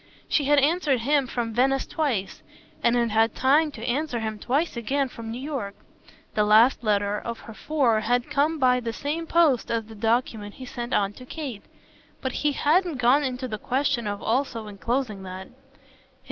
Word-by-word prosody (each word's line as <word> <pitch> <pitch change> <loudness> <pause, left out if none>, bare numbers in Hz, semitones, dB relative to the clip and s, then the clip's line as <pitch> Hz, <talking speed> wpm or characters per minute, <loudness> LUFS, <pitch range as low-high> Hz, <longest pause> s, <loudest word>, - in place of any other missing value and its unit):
She 290 - +1
had 290 +1 +4
answered 290 -3 +2
him 280 +2 +2
from 235 -2 -3
Venice 265 +3 +2
twice, 250 -12 -2 0.4
and 235 - +3
had 235 -2 +1
had 225 +1 +2
time 295 +4 +3
to 230 -2 -7
answer 260 0 -1
him 220 -1 -4
twice 290 +8 0
again 265 +4 -1
from 230 -2 -8
New 235 +2 -5
York. 260 -8 -4 0.6
The 210 - +2
last 220 +5 +5
letter 205 -1 +1
of 235 -1 -6
her 225 - -10
four 255 -4 +1
had 245 +5 0
come 305 +2 +2
by 250 -3 +3
the 235 -2 -4
same 310 +6 -3
post 315 -8 +3
as 230 -1 -1
the 220 - -12
document 220 -1 -1
he 260 - -9
sent 240 0 -6
on 200 0 +1
to 255 - -12
Kate, 265 -10 -6 0.5
but 260 - -3
he 295 +3 0
hadn't 325 +2 +2
gone 250 +4 +4
into 255 -1 -3
the 215 -3 -5
question 260 -2 0
of 205 0 -4
also 235 -1 -1
enclosing 215 +1 -2
that. 190 0 -8
245 Hz, 185 wpm, -25 LUFS, 220-280 Hz, 0.6 s, last